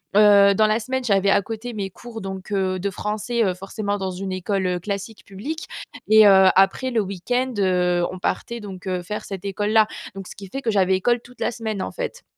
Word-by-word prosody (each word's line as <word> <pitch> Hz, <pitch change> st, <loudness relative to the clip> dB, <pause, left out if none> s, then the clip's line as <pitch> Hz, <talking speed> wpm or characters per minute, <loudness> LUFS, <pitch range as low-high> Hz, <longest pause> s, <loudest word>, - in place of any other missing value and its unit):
Heu, 200 Hz, -1 st, +7 dB
dans 215 Hz, +2 st, +3 dB
la 215 Hz, +1 st, +2 dB
semaine, 260 Hz, +3 st, -3 dB
j'avais 200 Hz, -3 st, +2 dB
à 195 Hz, -, +4 dB
côté 225 Hz, +4 st, -6 dB
mes 200 Hz, -3 st, -3 dB
cours 225 Hz, +3 st, -10 dB
donc, 190 Hz, +1 st, -7 dB
heu, 190 Hz, -2 st, 0 dB
de 200 Hz, +2 st, -1 dB
français, 215 Hz, +4 st, -2 dB
heu, 185 Hz, -, +1 dB
forcément 200 Hz, +2 st, -4 dB
dans 190 Hz, -1 st, -3 dB
une 190 Hz, +1 st, -5 dB
école, 185 Hz, +1 st, -1 dB
heu, 180 Hz, -1 st, -1 dB
classique, 200 Hz, +3 st, -6 dB
publique 265 Hz, +12 st, -6 dB, 0.4 s
et 215 Hz, 0 st, +8 dB
heu, 190 Hz, -1 st, +7 dB
après 195 Hz, +7 st, +3 dB
le 230 Hz, -2 st, +2 dB
week-end, 245 Hz, +7 st, -2 dB
heu, 180 Hz, -2 st, +2 dB
on 185 Hz, -, -8 dB
partait 235 Hz, +5 st, -2 dB
donc, 195 Hz, -2 st, -9 dB
heu, 180 Hz, -1 st, -1 dB
faire 210 Hz, +4 st, -5 dB
cette 195 Hz, -1 st, -7 dB
école-là. 210 Hz, +2 st, +2 dB, 0.3 s
Donc 195 Hz, -2 st, -7 dB
ce -, -, -10 dB
qui 200 Hz, -, -10 dB
fait 270 Hz, +9 st, -5 dB
que 230 Hz, -4 st, 0 dB
j'avais 190 Hz, -2 st, +3 dB
école 240 Hz, +6 st, +1 dB
toute 250 Hz, +1 st, -18 dB
la -, -, +1 dB
semaine, 220 Hz, -4 st, -4 dB
en -, -, -4 dB
fait. -, -, -5 dB
200 Hz, 225 wpm, -22 LUFS, 190-220 Hz, 0.4 s, et